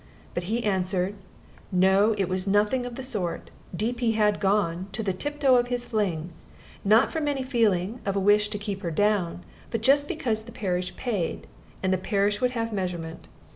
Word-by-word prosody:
But 175 - -3
he 230 +5 -1
answered, 190 -1 0 0.6
"No; 190 +4 +4
it 195 -2 +1
was 185 +1 -2
nothing 210 +5 +2
of 240 - -7
the 265 - -6
sort. 190 -10 -3 0.2
Deep 235 +6 -2
he 235 -2 +2
had 210 -1 +2
gone, 190 -3 +1
to 220 +3 -2
the 195 -3 0
tiptoe 280 +4 +2
of 245 0 +2
his 245 0 -2
fling; 180 -8 -1 0.5
not 215 +5 +4
from 315 -2 -1
any 280 -2 0
feeling 225 -4 +1
of 195 -1 -1
a - - +2
wish 205 +1 +4
to 210 - -3
keep 200 -2 -4
her 170 - -2
down, 180 -1 +1 0.3
but 230 - -2
just 285 +4 +4
because 240 -10 -1
the 230 +2 -12
parish 180 -4 -2
paid, 210 -10 -2 0.4
and 190 0 +2
the 185 - +1
parish 200 +2 0
would 250 0 +1
have 230 -1 -2
measurement. 175 -4 -4
205 Hz, 190 wpm, -26 LUFS, 185-235 Hz, 0.6 s, No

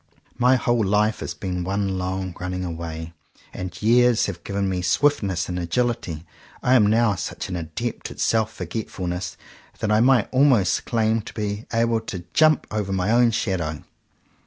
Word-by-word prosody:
My 125 +1 +5
whole 120 -1 +1
life 105 +2 +2
has - - -5
been 90 -2 -3
one 95 0 -1
long 95 0 -3
running 90 0 -3
away; 80 -1 -6 0.4
and 90 -1 -6
years 120 +1 +4
have 90 -3 -6
given 100 0 -2
me 95 -1 -1
swiftness 95 - +1
and 90 0 -3
agility. 90 -3 -2 0.4
I 125 - +3
am 110 -5 +6
now 110 0 +3
such 90 0 -5
an 90 - -3
adept 85 +8 -4
at - - -11
self 110 -1 +2
forgetfulness 90 -2 -4 0.4
that 110 -1 -1
I 105 - +4
might 125 -3 +4
almost 130 -7 +3
claim 110 -1 +1
to - - -10
be 105 0 -4
able 115 0 +2
to 95 -5 -7
jump 155 -2 +4
over 105 -2 -2
my 95 +2 0
own 120 0 +5
shadow. 90 -8 -2
100 Hz, 165 wpm, -23 LUFS, 90-115 Hz, 0.4 s, am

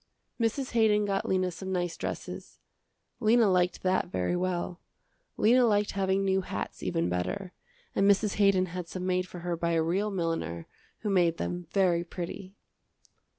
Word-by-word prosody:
Mrs. 235 +4 0
Haydon 215 -3 +3
got 195 -1 -1
Lena 185 -1 +1
some 190 +2 -6
nice 175 -2 -1
dresses. - - -6 0.6
Lena 225 +1 +4
liked 180 -1 +1
that 185 0 +1
very 90 - -1
well. 180 0 -2 0.6
Lena 245 +4 +5
liked 210 -3 +2
having 195 0 +1
new 190 0 +2
hats 100 - -5
even 85 - 0
better, 90 - -3 0.4
and 195 +1 +3
Mrs. 200 +1 +2
Haydon 200 -2 +4
had 180 -2 -4
some 180 +1 -5
made 185 0 0
for 180 - -9
her 175 0 -2
by 170 0 -1
a 165 -1 +2
real 190 +6 0
milliner 165 - -2 0.4
who 210 - -1
made 175 -3 +3
them 175 -1 -4
very 180 -4 +2
pretty. 185 +2 -7
185 Hz, 160 wpm, -29 LUFS, 175-200 Hz, 0.6 s, Lena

